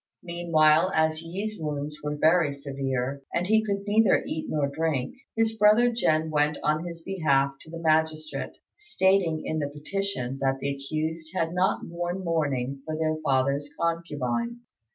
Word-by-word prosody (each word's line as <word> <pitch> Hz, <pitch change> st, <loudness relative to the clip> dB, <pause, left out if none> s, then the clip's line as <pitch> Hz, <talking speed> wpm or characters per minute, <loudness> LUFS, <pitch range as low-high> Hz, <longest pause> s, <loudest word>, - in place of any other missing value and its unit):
Meanwhile, 170 Hz, 0 st, +3 dB
as 160 Hz, 0 st, +2 dB
Yi's 195 Hz, +5 st, -4 dB
wounds 150 Hz, -1 st, -4 dB
were 150 Hz, 0 st, -2 dB
very 155 Hz, -1 st, +3 dB
severe, 135 Hz, -1 st, -3 dB
and 175 Hz, -, +1 dB
he 220 Hz, +3 st, +3 dB
could 200 Hz, -2 st, -2 dB
neither 210 Hz, -1 st, +4 dB
eat 160 Hz, -, -4 dB
nor 150 Hz, -2 st, +1 dB
drink, 140 Hz, -3 st, -1 dB, 0.2 s
his 225 Hz, 0 st, +2 dB
brother 220 Hz, +3 st, +5 dB
Jen 160 Hz, -8 st, +1 dB
went 150 Hz, 0 st, +2 dB
on 155 Hz, +3 st, +1 dB
his 170 Hz, -1 st, -7 dB
behalf 140 Hz, -8 st, +2 dB
to -, -, -14 dB
the 165 Hz, -, -7 dB
magistrate, 155 Hz, -1 st, 0 dB, 0.2 s
stating 190 Hz, -, +1 dB
in 155 Hz, -, -1 dB
the 145 Hz, -1 st, -2 dB
petition 150 Hz, -4 st, -3 dB
that 135 Hz, 0 st, +1 dB
the 140 Hz, +1 st, -2 dB
accused 155 Hz, +4 st, -4 dB
had 165 Hz, -2 st, 0 dB
not 180 Hz, +1 st, +1 dB
worn 175 Hz, +2 st, -4 dB
mourning 140 Hz, -6 st, -1 dB
for 155 Hz, +1 st, -4 dB
their 155 Hz, 0 st, 0 dB
father's 140 Hz, +1 st, +1 dB
concubine. 170 Hz, -, -2 dB
160 Hz, 155 wpm, -27 LUFS, 145-180 Hz, 0.2 s, brother